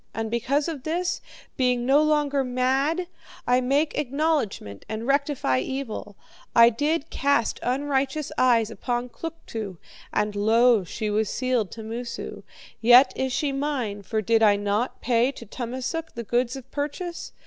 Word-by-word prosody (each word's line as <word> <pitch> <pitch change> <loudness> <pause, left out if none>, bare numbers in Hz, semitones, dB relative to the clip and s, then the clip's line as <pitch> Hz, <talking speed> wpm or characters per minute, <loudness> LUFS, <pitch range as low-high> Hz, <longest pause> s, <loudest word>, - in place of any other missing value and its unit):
And 225 -1 -3
because 270 +6 0
of 315 -5 -4
this, 350 +5 -1 0.4
being 250 -2 +1
no 275 +3 +5
longer 295 -2 +2
mad, 265 +7 0 0.4
I 250 +1 +3
make 280 +5 +1
acknowledgment 280 - -1
and 220 +1 -4
rectify 275 - +1
evil. 225 - -5 0.4
I 235 0 +8
did 295 +6 -1
cast 280 -5 +1
unrighteous 275 +3 -1
eyes 230 -3 +3
upon 240 +3 -3
Kluktu, 230 - -6 0.3
and 210 0 0
lo, 225 +1 +4
she 210 +4 -4
was 215 0 +1
sealed 255 -6 0
to 225 - -8
Moosu. 235 +2 -6 0.4
Yet 245 +3 +7
is 265 0 -1
she 280 +3 0
mine, 270 -8 -2
for 215 +2 -2
did 225 +2 +3
I 210 -2 +6
not 205 +4 -1
pay 245 +1 +2
to 235 - -10
Tummasook 255 +8 -5
the 235 - -4
goods 240 +3 0
of 265 -1 -10
purchase? 300 +4 -4
250 Hz, 150 wpm, -25 LUFS, 225-285 Hz, 0.4 s, I